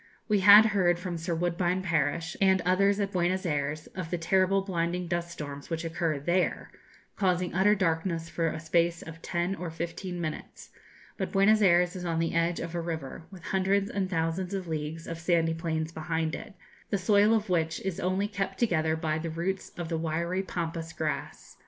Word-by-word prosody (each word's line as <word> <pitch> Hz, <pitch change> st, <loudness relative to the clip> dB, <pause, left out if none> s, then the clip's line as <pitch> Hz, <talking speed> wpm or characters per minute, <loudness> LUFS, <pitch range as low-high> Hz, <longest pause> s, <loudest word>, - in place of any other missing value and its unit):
We 210 Hz, -2 st, +3 dB
had 205 Hz, +3 st, +9 dB
heard 185 Hz, -5 st, +3 dB
from 175 Hz, -1 st, -4 dB
Sir 165 Hz, +1 st, -2 dB
Woodbine 175 Hz, +2 st, 0 dB
Parish, 165 Hz, -1 st, 0 dB
and 190 Hz, -1 st, +5 dB
others 195 Hz, +3 st, +2 dB
at 200 Hz, -1 st, -1 dB
Buenos 185 Hz, +1 st, 0 dB
Ayres, 150 Hz, -1 st, -1 dB
of 185 Hz, -3 st, -5 dB
the 175 Hz, -, -1 dB
terrible 190 Hz, +3 st, +2 dB
blinding 175 Hz, -1 st, -2 dB
dust 170 Hz, 0 st, -2 dB
storms 145 Hz, -4 st, -7 dB
which 165 Hz, 0 st, -3 dB
occur 165 Hz, -2 st, -1 dB
there, 175 Hz, +6 st, 0 dB, 0.4 s
causing 180 Hz, -2 st, 0 dB
utter 195 Hz, +4 st, +4 dB
darkness 165 Hz, -2 st, 0 dB
for 165 Hz, 0 st, -1 dB
a 155 Hz, -, -3 dB
space 170 Hz, +1 st, +1 dB
of 165 Hz, 0 st, -10 dB
ten 175 Hz, +1 st, -1 dB
or 180 Hz, -3 st, -5 dB
fifteen 170 Hz, +2 st, -5 dB
minutes; 155 Hz, -3 st, -6 dB, 0.5 s
but -, -, -3 dB
Buenos 210 Hz, +2 st, +5 dB
Ayres 180 Hz, -2 st, +4 dB
is 180 Hz, -, -5 dB
on 165 Hz, -2 st, -1 dB
the 165 Hz, 0 st, 0 dB
edge 170 Hz, +1 st, +1 dB
of 170 Hz, 0 st, -5 dB
a 170 Hz, -, -2 dB
river, 160 Hz, -2 st, -5 dB
with 185 Hz, -3 st, -12 dB
hundreds 195 Hz, +1 st, +1 dB
and 195 Hz, -2 st, -1 dB
thousands 175 Hz, +2 st, -1 dB
of 190 Hz, -2 st, -4 dB
leagues 160 Hz, +1 st, -4 dB
of 165 Hz, 0 st, -6 dB
sandy 165 Hz, -1 st, +2 dB
plains 160 Hz, -1 st, -2 dB
behind 160 Hz, 0 st, -2 dB
it, 210 Hz, -3 st, -7 dB, 0.3 s
the 200 Hz, -, +1 dB
soil 205 Hz, +3 st, +4 dB
of 220 Hz, -1 st, -1 dB
which 160 Hz, -2 st, +1 dB
is 190 Hz, -3 st, -3 dB
only 190 Hz, +3 st, 0 dB
kept 195 Hz, -2 st, -3 dB
together 160 Hz, -8 st, +1 dB
by 160 Hz, -1 st, -1 dB
the 165 Hz, +1 st, -4 dB
roots 175 Hz, +4 st, -3 dB
of 175 Hz, -1 st, -4 dB
the 165 Hz, -1 st, -1 dB
wiry 170 Hz, +3 st, -1 dB
pampas 165 Hz, -3 st, -4 dB
grass. 155 Hz, -1 st, -4 dB
170 Hz, 190 wpm, -28 LUFS, 165-190 Hz, 0.5 s, had